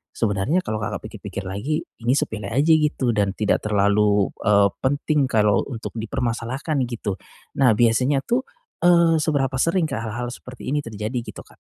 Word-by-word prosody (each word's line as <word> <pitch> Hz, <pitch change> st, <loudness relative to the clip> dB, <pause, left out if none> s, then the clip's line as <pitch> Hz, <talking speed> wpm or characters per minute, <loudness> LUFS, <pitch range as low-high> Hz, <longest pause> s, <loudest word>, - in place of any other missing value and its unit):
sebenarnya 115 Hz, -, 0 dB
kalau 110 Hz, 0 st, -3 dB
Kakak 105 Hz, -, -4 dB
pikir-pikir 100 Hz, -, -7 dB
lagi, 100 Hz, +12 st, -2 dB, 0.2 s
ini 120 Hz, +2 st, +1 dB
sepele 110 Hz, -9 st, -2 dB
aja 140 Hz, +9 st, +2 dB
gitu, 150 Hz, -5 st, +2 dB
dan 100 Hz, -3 st, 0 dB
tidak 105 Hz, -1 st, +1 dB
terlalu, 105 Hz, -1 st, +2 dB
eee, 100 Hz, -1 st, +5 dB
penting 145 Hz, +1 st, +1 dB
kalau 105 Hz, -5 st, +3 dB
untuk 120 Hz, -5 st, -6 dB
dipermasalahkan 120 Hz, +6 st, -2 dB
gitu. 110 Hz, -5 st, -4 dB, 0.4 s
Nah 125 Hz, -5 st, +5 dB
biasanya 125 Hz, +5 st, +2 dB
tuh, 245 Hz, +2 st, 0 dB, 0.4 s
eee, 170 Hz, -2 st, +5 dB
seberapa 135 Hz, -4 st, 0 dB
sering 170 Hz, +4 st, +2 dB
Kak, 135 Hz, -6 st, -3 dB
hal-hal 120 Hz, +2 st, -4 dB
seperti 125 Hz, +1 st, -10 dB
ini 150 Hz, -, +1 dB
terjadi 110 Hz, +1 st, -5 dB
gitu 120 Hz, -, -9 dB
Kak? -, -, -21 dB
120 Hz, 160 wpm, -22 LUFS, 105-145 Hz, 0.4 s, eee